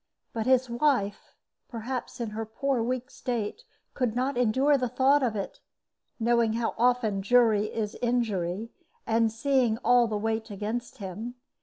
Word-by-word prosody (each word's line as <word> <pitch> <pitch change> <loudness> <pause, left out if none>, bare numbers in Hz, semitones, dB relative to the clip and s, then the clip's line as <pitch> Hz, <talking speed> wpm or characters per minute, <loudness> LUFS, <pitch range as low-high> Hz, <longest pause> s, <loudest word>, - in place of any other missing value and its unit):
But 225 0 -2
his 260 0 +4
wife, 240 -4 0 0.3
perhaps, 245 +2 -5
in 230 -3 -3
her 220 +1 -3
poor 245 +3 -1
weak 255 +2 -2
state, 240 - -3 0.3
could 245 -4 -1
not 260 +3 0
endure 260 +5 +3
the 255 -3 0
thought 270 +4 +3
of 240 -4 0
it, 200 - -5 0.6
knowing 235 -1 +2
how 230 0 -1
often 235 -4 +2
jury 215 -1 +4
is 215 -1 -3
injury, 225 -4 -1 0.3
and 225 0 +2
seeing 245 -1 +1
all 245 -1 +5
the 215 -1 -2
weight 220 +1 -2
against 220 +6 -4
him. 215 +4 -6
235 Hz, 150 wpm, -28 LUFS, 220-250 Hz, 0.6 s, all